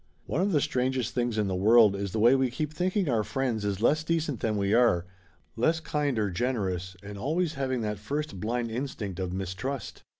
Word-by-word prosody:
One 155 - -1
of 200 +2 +1
the 150 -5 +3
strangest 130 -1 0
things 120 -2 -1
in 105 -2 +1
the 95 - -1
world 105 +2 +5
is 100 -1 -3
the - - -3
way 115 +4 +6
we 130 -1 +2
keep 150 +5 -3
thinking 185 +3 0
our 115 -5 +2
friends 110 0 -2
is 100 +1 -2
less 155 +5 +3
decent 160 -5 -1
than 110 -2 0
we 100 0 +1
are; 115 -8 +4 0.5
less 160 +8 +2
kind 150 -5 -1
or 105 -3 0
generous, 95 -5 -2
and 100 0 -8
always 155 - 0
having 130 -3 -1
that 105 -2 -3
first 145 0 -4
blind 115 +3 -2
instinct 110 -7 -4
of 90 -1 -2
mistrust. 95 +9 -4
120 Hz, 205 wpm, -28 LUFS, 105-140 Hz, 0.5 s, way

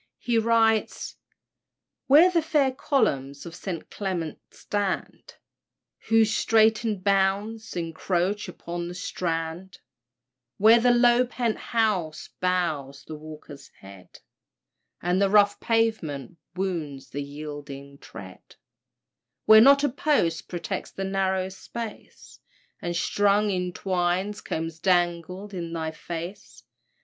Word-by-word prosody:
He 235 -2 +1
writes 225 -1 +1 0.9
"Where 315 +7 +7
the 340 -2 +2
fair 300 -4 +2
columns 140 - -1
of 170 - -8
St. 180 -2 -6
Clement 180 -6 -4
stand, 205 -2 -4 0.7
Whose 225 -1 +4
straitened 220 -3 +2
bounds 200 +3 0
incroach 180 +4 -1
upon 175 -1 -6
the 175 - -7
Strand; 170 0 -4 0.8
Where 220 +3 +7
the 245 +2 +3
low 240 +1 +4
pent 235 -2 -1
house 185 -9 -1
bows 155 -6 -1
the 155 - -9
walker's 150 -2 -11
head, 95 -1 -14 0.9
And 180 +2 +1
the 200 - +3
rough 205 0 +4
pavement 175 - -1 0.2
wounds 165 -8 -4
the 145 - -4
yielding 140 -1 -8
tread; 95 -4 -12 0.9
Where 220 0 +9
not 280 +3 +7
a 290 - +3
post 250 - 0
protects 170 -3 -4
the 195 - -6
narrow 190 -1 0
space, 220 +3 -9 0.4
And 175 0 -3
strung 205 +3 +2
in 180 -1 -2
twines 185 +2 -1
combs 165 0 -4
dangle 180 +2 0
in 170 -4 -6
thy 160 -1 -3
face. 170 +4 -8
185 Hz, 115 wpm, -26 LUFS, 165-220 Hz, 0.9 s, Where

